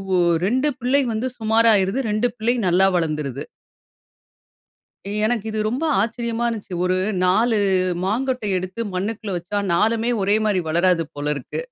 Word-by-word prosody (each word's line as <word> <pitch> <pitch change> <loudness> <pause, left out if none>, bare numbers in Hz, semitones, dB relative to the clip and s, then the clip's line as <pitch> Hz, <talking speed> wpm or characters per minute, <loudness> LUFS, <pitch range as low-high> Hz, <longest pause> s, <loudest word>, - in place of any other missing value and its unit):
ஓ - - +3 0.3
2 260 +7 +1
பிள்ளை 260 +4 +2
வந்து 225 +4 -1
சுமாரா 225 +1 +3
ஆயிருது. 195 +6 +1
2 215 +4 +1
பிள்ளை 230 +2 +1
நல்லா 180 +2 +4
வளந்துருது. 150 -5 -2 1.8
எனக்கு 225 -2 -1
இது 215 - -4
ரொம்ப 260 +8 -2 0.2
ஆச்சரியமா 235 +1 -2
இருந்துச்சு. 210 -5 -5
ஒரு 185 0 +1 0.3
4 220 +4 +3 0.5
மாங்கொட்டை 245 +1 -1
எடுத்து 185 +5 -6
மண்ணுக்குள்ள 205 +1 -3
வச்சா 190 +4 -3
4 225 +5 +1
ஒரே 200 +2 +3
மாரி 200 -3 +1
வளராது 170 0 +2
போலருக்கு. 145 - -3
215 Hz, 135 wpm, -21 LUFS, 185-235 Hz, 1.8 s, நல்லா